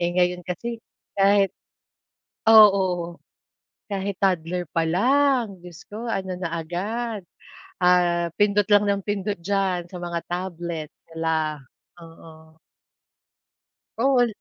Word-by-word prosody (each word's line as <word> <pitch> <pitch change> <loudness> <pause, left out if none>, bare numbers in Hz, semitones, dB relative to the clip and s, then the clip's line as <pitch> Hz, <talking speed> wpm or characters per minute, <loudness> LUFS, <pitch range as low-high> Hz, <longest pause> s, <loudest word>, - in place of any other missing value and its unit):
Eh, 175 - +1
ngayon 180 0 +2
kasi, 230 +6 -4 0.3
kahit 195 0 +4 1.0
Oo. 190 -6 +5 0.7
Kahit 200 0 -3
toddler 180 -2 0
pa 165 -1 0
lang, 245 +2 +2
Diyos 175 -3 -11
ko 215 +3 -7
ano 190 -5 -3
na 180 -2 -4
agad, 205 +5 -4 0.6
ah, 175 -1 +3
pindot 205 -1 +3
lang 205 -1 +5
nang 200 -1 -1
pindot 205 0 -2
diyan 185 -1 -1
sa 180 - -9
mga 170 -1 -3
tablet, 175 -3 -4 0.2
hala, 160 -2 -1 0.4
oo. 160 -1 -15 1.4
All. 250 0 +3
185 Hz, 110 wpm, -24 LUFS, 170-205 Hz, 1.4 s, Oo